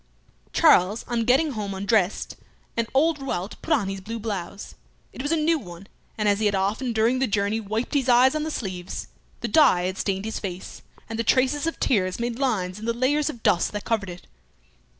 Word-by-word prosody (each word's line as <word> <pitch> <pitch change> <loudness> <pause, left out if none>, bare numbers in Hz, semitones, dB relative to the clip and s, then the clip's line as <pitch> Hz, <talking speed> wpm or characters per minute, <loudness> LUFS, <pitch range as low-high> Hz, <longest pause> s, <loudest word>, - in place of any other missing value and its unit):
Charles 195 +5 +4
on 235 -2 -1
getting 275 +6 +3
home 205 -5 -4
undressed, 200 -1 0 0.4
and 230 -1 0
old 310 +2 +3
Rouault 200 -7 -4
put 330 - -6
on 250 -11 +3
his 195 0 -4
blue 225 +4 -5
blouse. 200 -3 -5 0.4
It - - -6
was 290 +3 -2
a - - +3
new 320 +1 +2
one, 175 -4 -11 0.3
and 210 -1 0
as 200 0 +3
he 215 - +2
had 205 - +1
often 210 +6 -1
during 230 +3 +2
the 265 - +1
journey 205 +1 0
wiped 220 +5 -3
his 270 -3 +1
eyes 250 +2 +6
on 310 - -1
the 310 - -2
sleeves, 185 - -5 0.3
the - - -1
dye 285 - +5
had 185 +1 -3
stained 195 0 -1
his 220 - -3
face, 185 -2 -7 0.3
and 225 0 -5
the - - +1
traces 265 +6 +2
of 330 - -3
tears 185 -6 +1
made 235 +1 -3
lines 210 -8 -1
in 220 - -7
the 235 - 0
layer 260 +5 +1
of 295 -6 -3
dust 175 - +2
that 210 - -5
covered 215 -4 -1
it. 175 0 -10
220 Hz, 210 wpm, -24 LUFS, 195-260 Hz, 0.4 s, eyes